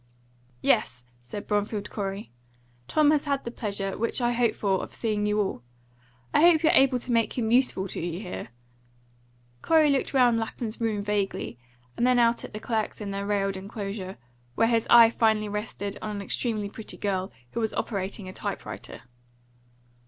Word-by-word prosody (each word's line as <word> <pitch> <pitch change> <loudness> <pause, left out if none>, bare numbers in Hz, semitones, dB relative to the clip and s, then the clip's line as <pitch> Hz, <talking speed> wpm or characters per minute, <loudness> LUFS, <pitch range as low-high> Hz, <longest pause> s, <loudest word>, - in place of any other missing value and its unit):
"Yes," 125 +1 +1 0.2
said 200 +12 -7
Bromfield 205 0 -1
Corey. 195 - -4 0.6
"Tom 300 -1 +4
has 300 -1 +2
had 280 -1 0
the 235 - -5
pleasure 200 -4 -3
which 230 +3 -1
I 240 -1 +2
hope 235 -2 +1
for 195 -2 0
of - - -7
seeing 210 -2 0
you 210 0 +1
all. 190 -11 -1 0.7
I - - +5
hope 335 -1 +6
you're 315 - +5
able 265 -1 +5
to 245 +1 -4
make 230 +1 +1
him 225 -2 0
useful 240 -6 +3
to - - -4
you 175 0 -3
here?" 185 -3 -6 1.1
Corey 315 -2 +4
looked 275 - 0
round 245 -4 +4
Lapham's 225 0 -5
room 215 -3 0
vaguely, 200 -11 -2 0.4
and 240 - +2
then 250 -1 +4
out 235 -1 +3
at - - -8
the 215 - -6
clerks 220 -1 -2
in 205 -2 -4
their 200 0 -3
railed 195 -1 0
enclosure, 195 -1 -6 0.4
where 225 - +3
his 230 -1 +1
eye 230 -1 +8
finally 220 -2 +2
rested 205 -1 -4
on 215 -1 -4
an 200 - -4
extremely 215 0 -1
pretty 215 +2 -8
girl, 190 -4 -2 0.2
who - - -3
was 220 -1 0
operating 195 -1 -3
a 185 - -7
type - - -4
writer. - - -8
215 Hz, 180 wpm, -27 LUFS, 200-235 Hz, 1.1 s, eye